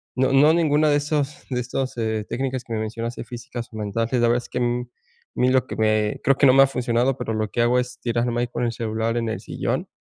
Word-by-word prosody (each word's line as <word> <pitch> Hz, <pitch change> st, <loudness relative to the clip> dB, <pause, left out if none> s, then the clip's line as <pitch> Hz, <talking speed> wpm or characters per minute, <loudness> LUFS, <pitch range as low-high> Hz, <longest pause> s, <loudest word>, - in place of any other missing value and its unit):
no 130 Hz, +1 st, +2 dB
no 145 Hz, +3 st, +6 dB
ninguna 155 Hz, -2 st, +3 dB
de 145 Hz, -, +4 dB
esos 145 Hz, -1 st, -2 dB
de 125 Hz, -1 st, -1 dB
esos, 130 Hz, +2 st, -3 dB
eh, 110 Hz, -2 st, -1 dB
técnicas 130 Hz, -1 st, -2 dB
que 115 Hz, -, -6 dB
me 110 Hz, -, -1 dB
mencionaste, 115 Hz, +2 st, -4 dB
físicas 120 Hz, 0 st, -7 dB
o 110 Hz, -, -7 dB
mentales, 110 Hz, +2 st, -2 dB
la 125 Hz, -, +3 dB
verdad 120 Hz, +1 st, +3 dB
es -, -, -13 dB
que, 125 Hz, -, -3 dB
mm, 120 Hz, 0 st, -1 dB, 0.5 s
mí 125 Hz, -, +2 dB
lo 130 Hz, -2 st, +2 dB
que -, -, -5 dB
me 110 Hz, -1 st, +1 dB
creo 135 Hz, -, +4 dB
que 140 Hz, -, +5 dB
no 130 Hz, -, +6 dB
me 135 Hz, -, +8 dB
ha -, -, +4 dB
funcionado, 125 Hz, 0 st, 0 dB
pero 110 Hz, -, -4 dB
lo 110 Hz, -1 st, -1 dB
que 120 Hz, -, 0 dB
hago 120 Hz, +1 st, +3 dB
es 125 Hz, 0 st, -5 dB
tirarme 120 Hz, 0 st, 0 dB
ahí 120 Hz, -, 0 dB
con 120 Hz, 0 st, -3 dB
el 115 Hz, -, 0 dB
celular 115 Hz, 0 st, -2 dB
en 115 Hz, -1 st, -1 dB
el 110 Hz, -, -3 dB
sillón, -, -, -3 dB
120 Hz, 260 wpm, -23 LUFS, 115-130 Hz, 0.5 s, me